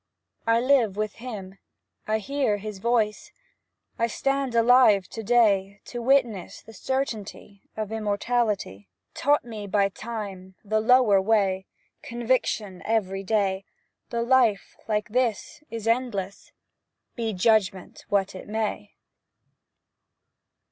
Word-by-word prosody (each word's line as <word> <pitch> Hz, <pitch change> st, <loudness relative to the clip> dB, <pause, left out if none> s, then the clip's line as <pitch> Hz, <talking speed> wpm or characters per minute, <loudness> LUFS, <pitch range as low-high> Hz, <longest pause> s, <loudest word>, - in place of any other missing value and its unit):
I 230 Hz, 0 st, +4 dB
live 245 Hz, -6 st, +3 dB
with 215 Hz, -1 st, -2 dB
him, 195 Hz, -6 st, -7 dB, 0.5 s
I 215 Hz, 0 st, +2 dB
hear 230 Hz, -1 st, 0 dB
his 210 Hz, -1 st, -7 dB
voice, 220 Hz, -1 st, 0 dB, 0.7 s
I 230 Hz, -, +2 dB
stand 275 Hz, +1 st, -1 dB
alive 230 Hz, -5 st, +5 dB
to 225 Hz, -, -6 dB
day 205 Hz, -4 st, +2 dB
To 240 Hz, -, -6 dB
witness 240 Hz, -6 st, +1 dB
to -, -, -31 dB
the 225 Hz, -, -13 dB
certainty 215 Hz, -4 st, -4 dB, 0.2 s
Of 215 Hz, -1 st, -3 dB
immortality 210 Hz, -, -1 dB, 0.2 s
Taught 290 Hz, -2 st, +2 dB
me 215 Hz, -3 st, -7 dB
by 200 Hz, 0 st, +2 dB
Time, 195 Hz, -4 st, -7 dB
the 215 Hz, +1 st, +1 dB
lower 220 Hz, -3 st, +5 dB
way, 190 Hz, -2 st, +1 dB, 0.3 s
Conviction 230 Hz, -5 st, -1 dB
every 195 Hz, -4 st, 0 dB
day, 195 Hz, -2 st, 0 dB, 0.5 s
That 235 Hz, 0 st, -1 dB
life 240 Hz, -5 st, +2 dB
like 210 Hz, -1 st, -1 dB
this 250 Hz, +4 st, -1 dB
is 225 Hz, -1 st, -5 dB
endless, 230 Hz, -5 st, -2 dB, 0.6 s
Be 230 Hz, -2 st, -2 dB
judgment 195 Hz, -2 st, +1 dB
what 195 Hz, -1 st, +1 dB
it 185 Hz, -, -9 dB
may. 210 Hz, -, -3 dB
215 Hz, 120 wpm, -25 LUFS, 195-235 Hz, 0.7 s, alive